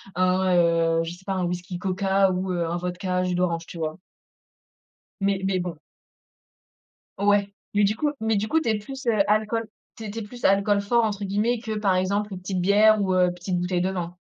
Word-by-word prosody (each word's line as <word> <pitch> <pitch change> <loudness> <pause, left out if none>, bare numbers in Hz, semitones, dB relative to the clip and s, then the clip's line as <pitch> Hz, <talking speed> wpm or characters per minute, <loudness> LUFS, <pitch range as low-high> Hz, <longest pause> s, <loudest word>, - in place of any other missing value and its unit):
un, 185 0 +2
heu, 165 -1 +3
je 165 - -5
sais 180 +2 -15
pas, 195 - -2
un 180 -1 0
whisky 180 0 -4
Coca 195 +1 +2
ou 185 +1 -2
heu, 170 -2 -1
un 170 - -2
vodka 180 +1 -2
jus 180 -1 -1
d'orange, 170 -2 0
tu - - -9
vois? 160 -1 -3 1.2
Mais 195 -1 +1
mais 190 -1 +1
bon. 175 -2 -4 1.4
Ouais, 200 0 +2 0.2
mais 205 - +4
du 205 +2 +2
coup 295 +4 0
mais 220 0 +1
du 210 - -1
coup, 320 +7 +2
tu 310 - -2
es 220 - +2
plus, 265 +5 -9
heu, 220 -3 +2
alcool, 220 +1 +1 0.3
tu 225 - -8
es 210 - -5
tu 225 - -5
es - - -4
plus 240 +4 -11
alcool 200 +1 +3
«fort», 235 +3 +2
entre 205 -2 -2
guillemets, 215 +5 0
que, 220 -2 -4
par 195 -3 +2
exemple, 200 +3 0
une 185 - -6
petite 185 0 -3
bière 210 +3 +5
ou 190 -1 +1
heu, 180 -1 +3
petite 180 0 -3
bouteille 180 0 0
de 185 - 0
vin? 180 -1 -5
190 Hz, 220 wpm, -24 LUFS, 180-210 Hz, 1.4 s, bière